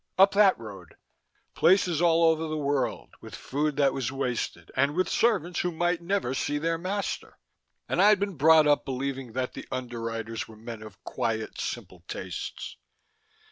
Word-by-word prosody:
Up 195 +1 +7
that 200 -2 +5
road." 100 -7 -11 0.6
Places 175 -3 +3
all 170 -1 +4
over 160 0 +3
the 155 0 -3
world, 140 -3 -1
with - - -9
food 150 +2 -2
that 140 -2 +3
was 130 -2 -2
wasted, 130 -3 -3
and 140 +3 +2
with 185 +1 +1
servants 190 -7 +1
who 180 - 0
might 175 +1 0
never 175 -7 -1
see 145 +2 -1
their 165 +2 -1
master! 195 +3 -4 0.5
And - - +1
I'd 205 0 +6
been 200 0 -1
brought 155 +2 +6
up 145 -1 +3
believing 135 -2 -4
that 130 +1 -2
the - - -8
Underwriters 115 -3 -4
were 110 - -14
men 115 0 -8
of 110 -3 -12
quiet, 115 -3 -3
simple - - -6
tastes! - - -6
145 Hz, 165 wpm, -27 LUFS, 125-175 Hz, 0.6 s, Up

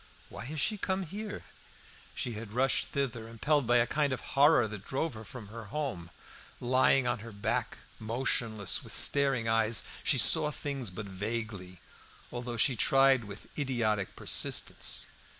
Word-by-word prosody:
"Why - - -8
has 155 +4 -5
she 210 +7 0
come 190 0 0
here?" 205 +5 -6 0.7
She 120 - -3
had 110 -1 -7
rushed 130 +3 +2
thither; 125 -5 -2
impelled 135 +4 +1
by 120 +1 +5
a 120 - +4
kind 145 +2 0
of 130 - -1
horror 140 -4 +6
that 105 -2 -7
drove 140 +6 -2
her 110 0 -8
from 110 -1 -9
her 115 +1 -8
home. 115 - -4 0.5
Lying 130 +1 +3
on 120 -1 0
her 115 +2 -9
back, 100 -1 -2 0.2
motionless, 110 -2 +1
and - - -11
with - - -6
staring 135 -5 +3
eyes, 115 0 +2 0.2
she 135 - +3
saw 150 +4 +3
things 140 -5 -3
but 95 +3 -6
vaguely, 100 -2 -5 0.5
although 120 -1 -4
she 130 +3 +4
tried 135 +2 +5
to 110 - -10
with 100 0 -10
idiotic 110 -8 0
persistence. - - -1
120 Hz, 165 wpm, -31 LUFS, 110-140 Hz, 0.7 s, horror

